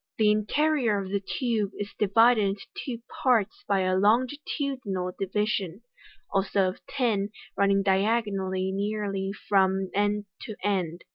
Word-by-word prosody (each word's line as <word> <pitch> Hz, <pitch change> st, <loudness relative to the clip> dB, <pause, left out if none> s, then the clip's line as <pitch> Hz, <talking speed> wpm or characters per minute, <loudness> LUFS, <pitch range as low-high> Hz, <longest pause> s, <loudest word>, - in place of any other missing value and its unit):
The 215 Hz, -1 st, +4 dB
interior 235 Hz, +2 st, +1 dB
of 190 Hz, -1 st, -4 dB
the 200 Hz, -, +1 dB
tube 215 Hz, -1 st, -1 dB
is 205 Hz, 0 st, -5 dB
divided 225 Hz, +3 st, +5 dB
into 200 Hz, 0 st, -2 dB
two 235 Hz, -3 st, -5 dB, 0.2 s
parts 225 Hz, -6 st, +2 dB
by 200 Hz, -2 st, +2 dB
a 185 Hz, 0 st, +1 dB
longitudinal 235 Hz, -, 0 dB
divi 200 Hz, +2 st, 0 dB
sion, 200 Hz, -1 st, -3 dB, 0.5 s
also 195 Hz, -1 st, +2 dB
of 185 Hz, -, -9 dB
tin, 225 Hz, -7 st, 0 dB, 0.3 s
running 200 Hz, 0 st, +3 dB
diagonally 195 Hz, -2 st, +1 dB
nearly 200 Hz, -1 st, -2 dB, 0.2 s
from 190 Hz, -1 st, +2 dB
end 205 Hz, +1 st, +1 dB
to 215 Hz, -, -7 dB
end. 180 Hz, -4 st, -1 dB
205 Hz, 135 wpm, -27 LUFS, 195-225 Hz, 0.5 s, divided